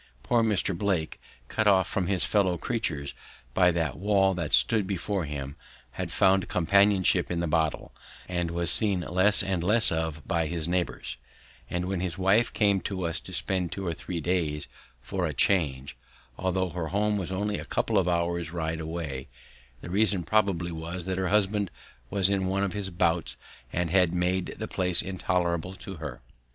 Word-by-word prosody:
Poor 120 -1 +2
Mr. 105 -4 +1
Blake, 90 -4 -1 0.3
cut 110 +7 0
off 95 -2 +4
from 95 -4 -1
his 95 -2 +4
fellow 95 -4 +2
creatures 80 - -3 0.4
by 90 +2 +5
that 80 -5 -1
wall 95 -1 +3
that 85 -4 -3
stood 110 -4 +3
before 95 -1 -2
him, 70 -1 -5 0.4
had - - -5
found 95 0 +3
companionship 100 +2 +3
in 85 - -1
the 85 - 0
bottle, 80 -1 -1 0.3
and 90 -2 -2
was 85 0 0
seen 100 -5 +2
less 95 +4 +3
and 95 -3 -1
less 110 +5 +6
of 80 -2 -3
by 85 -4 0
his 80 0 -2
neighbours; 90 -8 -2 0.5
and 90 0 -2
when 95 0 -2
his 90 -1 -3
wife 100 +5 +3
came 100 -3 +2
to 95 -3 -3
us 85 0 -1
to - - -10
spend 90 -1 -1
two 100 - -5
or 85 - -1
three 85 +2 -5
days 80 -3 -1 0.4
"for 90 +5 -2
a 75 - -5
change," 70 -6 +1 0.4
although 95 +2 -1
her 85 -2 -3
home 105 +4 0
was 95 -3 -3
only 105 +2 -1
a - - -6
couple 110 -3 +1
of 90 - 0
hours' 85 -1 0
ride 80 -1 -3
away, 80 -5 -5 0.5
the - - -8
reason 100 -2 +2
probably 90 -2 +1
was 85 +2 -6
that 95 0 -2
her 95 - 0
husband 100 0 +2 0.4
was 95 -2 +2
in 95 -1 0
one 95 +1 0
of 100 - -1
his 100 -2 -3
bouts 85 -7 0 0.3
and 85 -2 -1
had 90 -2 +3
made 90 +1 0
the - - -4
place 90 -2 +2
intolerable 90 -1 -1
to 95 -1 -8
her. 75 -5 -7
90 Hz, 180 wpm, -27 LUFS, 85-95 Hz, 0.5 s, less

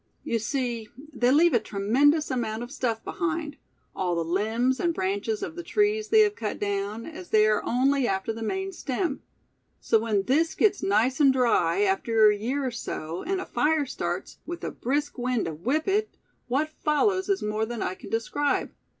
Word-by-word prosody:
"You 230 - -1
see, 235 -1 -2 0.2
they 245 -2 +2
leave 320 +5 +5
a 235 - +5
tremendous 270 +11 +2
amount 230 -2 -2
of 240 - -9
stuff 235 -6 -2
behind; 320 -5 -3 0.4
all 180 -2 -1
the 165 -1 -1
limbs 220 +9 0
and 340 -2 0
branches 200 +3 -1
of 320 - -5
the 350 - -5
trees 420 +4 +1
they 440 -1 +6
have 415 -1 +3
cut 215 -2 -4
down, 205 +2 -3
as 330 +2 -9
they 215 0 +5
are 215 -1 +2
only 265 +1 +2
after 195 +3 -1
the 225 - -8
main 385 - -2
stem; 305 -2 -3 0.6
so 225 - +2
when 215 -3 0
this 315 +9 +1
gets 405 -2 +2
nice 225 +7 +2
and 280 -3 +6
dry, 225 -9 +2
after 210 +2 +4
a - - 0
year 255 +7 -2
or 255 - -1
so, 165 -7 -5
and 385 0 -2
a - - -4
fire 300 +4 +1
starts, 260 - -4
with 345 0 -7
a - - -3
brisk 285 +2 -2
wind 245 -1 0
to 165 - -3
whip 260 - -1
it, 420 +2 0 0.3
what 285 +5 0
follows 375 +6 +2
is 395 - +1
more 215 +1 -1
than 235 -1 -4
I - - -2
can - - -11
describe. 280 +6 -1
250 Hz, 195 wpm, -26 LUFS, 215-310 Hz, 0.6 s, they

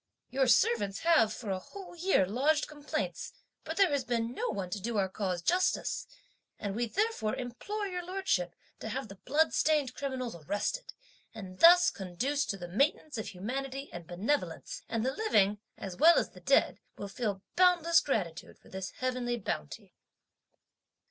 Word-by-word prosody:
Your 265 +1 +2
servants 205 -5 +3
have 325 -10 +4
for 215 -2 -5
a 190 - -1
whole 380 - -11
year 350 - +3
lodged 280 +10 +1
complaints, 295 -1 -4 0.3
but - - -5
there 390 -5 +5
has 285 -2 +1
been 235 -1 -1
no - - -2
one 195 -4 -4
to 205 - -2
do 230 +2 -2
our 195 -1 +2
cause 185 -2 -3
justice, 365 +2 +1 0.5
and 200 -1 -4
we 235 +1 0
therefore 405 - 0
implore 270 - -4
your 360 -2 -4
Lordship 345 - -1 0.2
to 220 - -5
have 260 +1 -4
the 195 - -10
bloodstained 305 0 +2
criminals 260 -3 -4
arrested, 205 - -3 0.4
and 185 -4 -9
thus 350 +1 +8
conduce 240 +10 -2
to 195 - -2
the 175 -2 -7
maintenance 275 - 0
of 220 - -4
humanity 265 +8 -5
and 175 -2 -8
benevolence; 180 - -2
and 230 0 -1
the 265 - 0
living, 210 - +2 0.2
as 190 -2 -6
well 330 - +7
as - - +1
the - - -14
dead, - - +3 0.2
will 200 - -5
feel 200 -2 -3
boundless 345 -2 +5
gratitude 180 - -3
for - - -20
this 190 0 -5
heavenly 250 -1 -1
bounty." 75 - -5
240 Hz, 165 wpm, -31 LUFS, 195-310 Hz, 0.5 s, thus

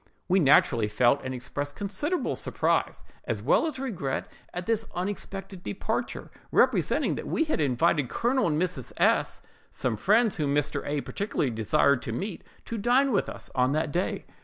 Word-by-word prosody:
"We 185 +1 +4
naturally 130 - +4
felt 120 +6 +3
and 130 - -4
expressed 145 +3 -4
considerable 290 - -2
surprise, - - 0 0.2
as - - -2
well - - +3
as 300 -4 -4
regret 190 - -3 0.2
at 180 0 -5
this 225 -1 +1
unexpected 195 0 -5
departure; 190 - -3 0.2
representing - - +3
that - - -5
we - - +1
had 310 - -1
invited 145 0 +2
Colonel 250 - +1
and 155 -2 +1
Mrs. 170 -8 -2
S——, - - +2 0.3
some 125 -3 -2
friends 215 - +3
whom 145 -3 0
Mr. 145 -1 0
A—— 145 0 -1
particularly 175 - -2
desired 120 +4 +2
to - - -5
meet, 190 - -4 0.2
to 230 - -4
dine 255 +5 +3
with 200 - +1
us - - -8
on 130 +1 +2
that 155 0 0
day. 175 +5 -2
165 Hz, 165 wpm, -27 LUFS, 135-205 Hz, 0.3 s, We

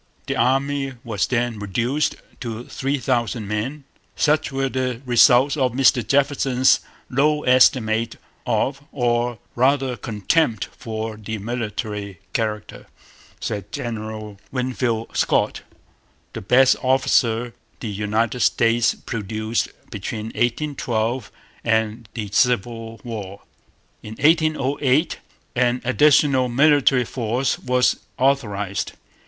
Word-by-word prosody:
The - - -2
Army 135 +2 +1
was 110 -5 -1
then 120 -3 -1
reduced 120 +9 -1 0.2
to 115 -1 -5
three 135 +3 -2
thousand 120 -4 -1
men. 115 +8 -3 0.3
'Such 155 +1 +2
were 135 0 0
the 130 -2 -2
results 125 +3 +5
of 130 -5 +1
Mr 130 -1 +4
Jefferson's 135 -1 +3 0.3
low 150 +3 +1
estimate 115 -3 +3 0.3
of, 135 +1 0
or 120 -2 0 0.2
rather 130 0 +2
contempt 110 - 0
for, 110 -1 -5
the 110 +1 -5
military 105 -3 -4
character,' 110 -2 -3 0.5
said 105 -1 -4
General 110 -5 -5
Winfield 125 -3 -2
Scott, - - +1 0.7
the - - -5
best 125 +6 +4
officer 125 -3 +2 0.3
the 115 - -5
United 105 +4 -1
States 115 -1 +3
produced 110 +1 -3 0.2
between 110 +2 -5
'1812' 120 -3 -1 0.3
and 110 0 0
the 110 -3 -3
Civil 115 0 0
War. 105 -5 -7 0.6
In 110 +1 -8
1808 150 -1 +2 0.4
'an 125 0 +2
additional 135 -1 +4
military 135 -1 +4
force' 120 +2 -1
was 125 0 +2 0.2
authorized. 105 -8 0
120 Hz, 105 wpm, -22 LUFS, 110-135 Hz, 0.7 s, results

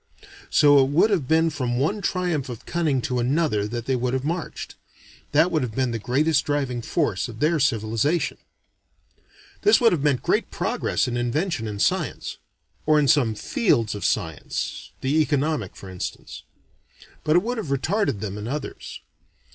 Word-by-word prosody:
So 145 -2 +6
it 130 - 0
would 170 +9 +3
have 165 -10 0
been 160 +2 +3
from 125 -4 -2
one 175 +11 0
triumph 175 -7 -1
of 120 -3 -8
cunning 155 -6 0
to 125 -4 -1
another 125 -5 +1
that 120 +1 -5
they 130 - +1
would 125 +1 -1
have 130 +1 -2
marched. 165 +2 -4 0.6
That 155 +5 +4
would 155 -3 +1
have 120 -4 -4
been 130 -2 0
the 115 - -3
greatest 140 +6 +2
driving 135 -4 -1
force 115 - -1
of 110 -2 -10
their 155 +3 +2
civilization. 115 +5 0 1.2
This 415 - +5
would 235 -2 +5
have 165 - 0
meant 140 -3 +1
great - - +1
progress - - -1
in 120 -1 -2
invention 120 - -1
and 105 -1 -5
science - - -1 0.5
or 155 0 +5
in 145 -2 +3
some 130 -7 +3
fields 115 - +1
of 100 -2 -6
science, 80 -4 -2
the 145 +4 +2
economic 145 - -1
for 95 - -11
instance. 95 -1 -6 0.8
But 155 - +2
it 175 - +4
would 240 +1 -2
have 205 - -4
retarded 140 - 0
them 105 -1 -4
in 105 - -5
others. 145 +3 -6
140 Hz, 170 wpm, -24 LUFS, 120-160 Hz, 1.2 s, So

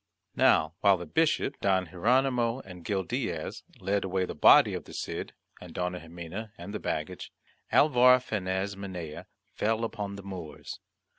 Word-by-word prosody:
Now, 80 0 +4
while 100 -2 +5
the 90 - -7
Bishop 160 - +1
Don 95 -2 +2
Hieronymo 120 +6 +1
and 90 -5 -12
Gil 95 +1 -1
Diaz - - -3 0.2
led 100 +2 0
away 95 -1 0
the - - -6
body - - +6
of - - -5
the - - -12
Cid, - - -5 0.3
and 90 -2 -11
Dona 90 0 -2
Ximena, 85 +6 -8
and 100 - -8
the 105 - -3
baggage, 80 +4 -4 0.4
Alvar 125 -3 +6
Fanez 100 -4 -2
Minaya 90 -6 -7 0.3
fell 110 +2 0
upon 105 -3 -4
the 100 - -9
Moors. 90 -5 -8
95 Hz, 155 wpm, -29 LUFS, 90-110 Hz, 0.4 s, body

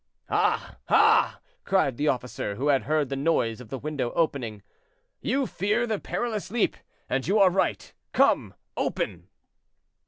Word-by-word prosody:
"Ah! - - +1
ah!" - - +4 0.2
cried 190 -10 +2
the 150 - 0
officer, 125 -5 -2
who 140 +7 -1
had 135 -2 +3
heard 150 -2 +1
the 135 - -2
noise 135 -6 0
of 115 - -12
the 135 - -4
window 145 -3 -3
opening; 120 -10 -1 0.6
"you 275 0 0
fear 215 +2 0
the 220 -3 -2
perilous 220 -5 -3
leap, 230 +1 +1 0.3
and 130 +2 -1
you 200 +4 +3
are 195 -3 +6
right. 190 - -1 0.2
Come, - - +2 0.2
open!" - - -2
150 Hz, 150 wpm, -26 LUFS, 130-200 Hz, 0.6 s, are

